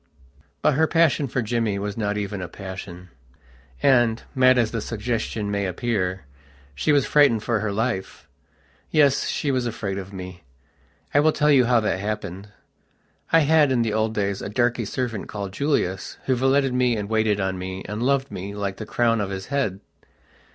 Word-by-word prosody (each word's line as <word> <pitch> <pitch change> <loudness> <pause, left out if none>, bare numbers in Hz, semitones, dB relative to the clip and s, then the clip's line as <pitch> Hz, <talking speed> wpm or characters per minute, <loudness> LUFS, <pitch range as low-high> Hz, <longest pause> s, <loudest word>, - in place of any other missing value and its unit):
But - - +4
her 160 +4 +3
passion 155 -4 +2
for 125 0 -1
Jimmy 110 -2 0
was 100 0 -4
not 105 -2 -1
even 100 -1 -3
a 90 - -4
passion, 90 -1 -9 0.7
and, 120 -4 +3
mad 130 -1 +5
as 115 -3 +2
the 115 - -2
suggestion 110 -2 -3
may 100 -1 -1
appear, 95 - -2 0.5
she 70 - 0
was 145 -3 +3
frightened 140 -8 +4
for 115 -2 0
her 110 0 -2
life. 105 -2 -3 0.6
Yes, 145 -3 +3
she 145 - -1
was 130 -2 0
afraid 100 -4 -3
of 95 0 -8
me. 90 -2 -8 0.7
I 145 - +5
will 155 +2 +4
tell 150 0 +2
you 130 -3 +5
how 120 0 +4
that 105 -3 -1
happened. 100 -1 -5 0.8
I 165 - +6
had, 150 -1 +4
in 120 -3 +2
the 110 -2 -1
old 110 0 0
days, 100 -1 -1
a - - -5
darky 120 +1 0
servant, 115 -1 -3
called 100 -2 -6
Julius, 105 -8 -1
who 130 - +2
valeted 135 +1 +2
me, 125 -2 +2
and 105 -1 -3
waited 110 -1 +1
on 95 -1 -2
me, 95 +1 -5
and 105 +2 -4
loved 135 +2 +1
me, 100 +2 -6
like 100 -2 -3
the 110 - -7
crown 115 -2 +1
of 100 - -2
his 95 -1 -5
head. 105 -9 -1
110 Hz, 185 wpm, -23 LUFS, 100-125 Hz, 0.8 s, I